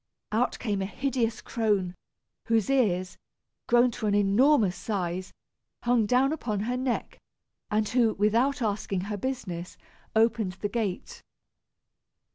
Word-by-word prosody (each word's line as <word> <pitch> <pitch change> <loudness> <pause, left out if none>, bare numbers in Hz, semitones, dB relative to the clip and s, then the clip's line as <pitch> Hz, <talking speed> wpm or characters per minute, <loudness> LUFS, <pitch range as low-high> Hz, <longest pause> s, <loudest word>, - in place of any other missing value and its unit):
Out 230 +4 +1
came 205 -4 -2
a 190 - -1
hideous 245 -1 -1
crone, 205 -6 0 0.5
whose 225 +1 +1
ears, 185 -9 +1 0.5
grown 240 +1 +4
to 220 - -3
an 205 - +2
enormous 205 +1 +4
size, 185 -3 -3 0.5
hung 240 -3 +3
down 260 +5 +3
upon 215 -10 -2
her 245 +4 -1
neck, 255 -1 -2 0.5
and 215 0 +1
who, 235 -2 +2
without 235 +7 +2
asking 200 -3 -1
her 205 +2 -4
business, 190 -8 -4 0.4
opened 220 -3 +2
the 205 +2 -4
gate. 205 -4 -3
220 Hz, 125 wpm, -27 LUFS, 200-245 Hz, 0.5 s, grown